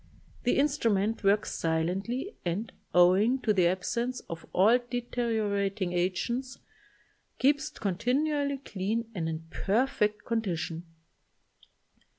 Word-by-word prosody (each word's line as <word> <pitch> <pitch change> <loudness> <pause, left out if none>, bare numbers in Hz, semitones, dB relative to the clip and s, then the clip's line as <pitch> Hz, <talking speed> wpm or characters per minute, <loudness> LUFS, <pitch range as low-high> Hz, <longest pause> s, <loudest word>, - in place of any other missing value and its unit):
The 245 - +3
instrument 225 -7 +1
works 200 +1 +3
silently 190 - -1
and, 185 +6 -2 0.2
owing 185 +8 +5
to 215 - +3
the 180 -3 +4
absence 235 +8 -1
of 165 -1 -7
all 220 +7 +5
deteriorating 220 -6 -1
agents, 215 +9 -1 0.8
keeps 285 +2 +2
continually 280 - 0
clean 225 -1 -3
and 165 -5 -2
in 160 0 -4
perfect 210 -1 0
con 230 -1 0
dition. 165 -4 -3
215 Hz, 105 wpm, -29 LUFS, 185-245 Hz, 0.8 s, owing